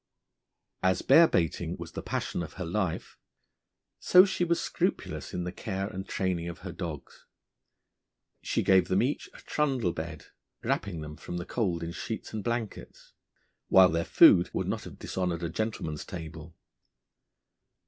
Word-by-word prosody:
As 95 0 +2
bear 160 +5 +7
baiting 85 - -1
was - - -8
the - - -5
passion - - -3
of 80 -3 -6
her 90 - -5
life, 90 0 -2 0.8
so 185 +1 +7
she 190 -2 -1
was 170 -1 +1
scrupulous - - -2
in 90 - -3
the 90 - -3
care 95 -1 -4
and 95 -2 -6
training 90 -3 -1
of 85 - -9
her 90 - -4
dogs. 85 -4 -7 1.1
She - - 0
gave 95 -2 +5
them 95 +4 +2
each 140 +4 -2
a - - -12
trundle 135 - 0
bed, 80 -1 -6 0.4
wrapping 95 -6 -1
them 75 0 -8
from 90 - -6
the 85 - -4
cold 90 -7 -1
in 85 - -4
sheets 110 +7 -6
and 110 -2 -3
blankets, 115 -3 -5 0.5
while 95 -1 +7
their 85 +1 0
food 85 +1 +6
would - - -1
not - - -3
have - - -10
dishonoured 90 -2 -2
a 85 - -1
gentleman's 85 -5 -3
table. 80 -3 -8
90 Hz, 160 wpm, -29 LUFS, 85-110 Hz, 1.1 s, bear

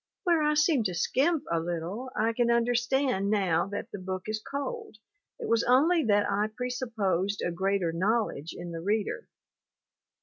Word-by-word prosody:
Where 340 -4 +3
I 300 0 +2
seem 300 -4 +3
to 180 -3 -1
skimp 285 - +1
a 170 - +2
little, 175 +9 -4
I 225 +1 +1
can 235 0 +1
understand 240 -2 +1
now 190 -5 +2
that 205 - -6
the 205 - -6
book 185 0 -4
is 215 0 -3
cold, 285 - -5 0.4
it - - -4
was 230 0 +2
only 305 +7 +4
that 205 -1 +3
I 205 +1 +1
presupposed 215 -5 -2
a 175 - 0
greater 190 0 0
knowledge 185 -3 -1
in 175 0 -6
the 165 -1 -5
reader. 210 - -1
215 Hz, 165 wpm, -28 LUFS, 190-255 Hz, 0.4 s, only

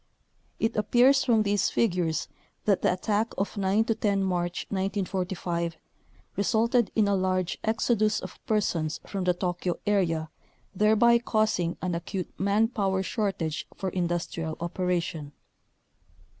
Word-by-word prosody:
It 225 +1 0
appears 250 +5 +4
from 225 -4 +3
these 205 -1 +1
figures 175 -8 0 0.4
that 200 -3 +3
the - - +3
attack 210 +5 -1
of 200 +3 -2
9 200 +2 +2
10 205 -3 +1
March 175 -2 -1
1945 185 -4 -2 0.6
resulted 230 +3 +2
in 215 -2 +3
a 200 - +2
large 185 -1 0
exodus 220 -1 +1
of - - -10
persons 170 -8 0
from 195 -2 -3
the 180 -1 +2
Tokyo 175 -1 -2
area 165 -6 +1 0.4
thereby 220 +4 +4
causing 215 -7 0
an 180 -1 -1
acute 175 +2 -4
man 200 +3 +3
power 195 -5 0
shortage 190 -8 -2
for 190 - -3
in 180 -2 -1
dustrial 165 -2 -3
operation. 170 -3 -2
195 Hz, 130 wpm, -27 LUFS, 175-215 Hz, 0.6 s, appears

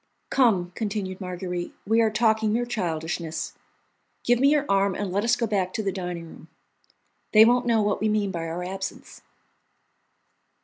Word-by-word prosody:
"Come," 200 -9 +3
continued 200 -3 -4
Marguerite, 180 -1 -5
"we 225 +3 +3
are 225 - +3
talking 220 0 +2
mere 240 +3 0
childishness. 170 -6 -3 0.7
Give 240 0 +3
me 275 +2 +5
your 295 -1 +2
arm 195 -1 +2
and 200 -3 -3
let 200 +3 0
us 235 +1 +3
go 235 - -1
back 195 -4 -1
to 220 - -2
the 195 - 0
dining 180 -3 -5
room. 160 - -13 0.9
They 215 0 +9
won't 245 +1 +3
know 225 -2 +3
what 205 -1 0
we 215 - +2
mean 210 -2 0
by 165 -2 -4
our 170 +2 -4
absence." 190 +1 -6
200 Hz, 170 wpm, -25 LUFS, 180-225 Hz, 0.9 s, They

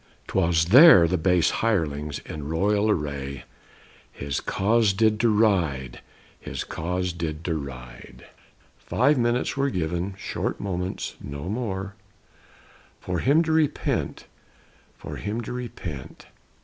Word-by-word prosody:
'Twas 85 -2 +2
there 125 - +9
the 90 - 0
base 90 -1 +2
hirelings, 75 -9 -1
in 75 -1 -7
royal 100 +6 +1
array, 70 -6 -2 0.7
His 70 -1 -4
cause 110 0 +2
did 110 +1 +2
deride; 95 - +1 0.4
his - - -5
cause 90 +2 -3
did 80 -2 -5
deride. 70 -8 -7 0.5
Five 140 +3 +2
minutes 120 +1 0
were 140 0 +1
given, 90 0 -2
short - - -3
moments, 90 -2 -4
no 70 0 -7
more, 100 -3 -3 1.1
For 90 -1 -3
him 145 - +3
to 160 - -2
repent; 155 -2 0 0.7
for - - -8
him 105 +3 -3
to 115 - -6
repent. 90 - -7
90 Hz, 115 wpm, -25 LUFS, 80-110 Hz, 1.1 s, there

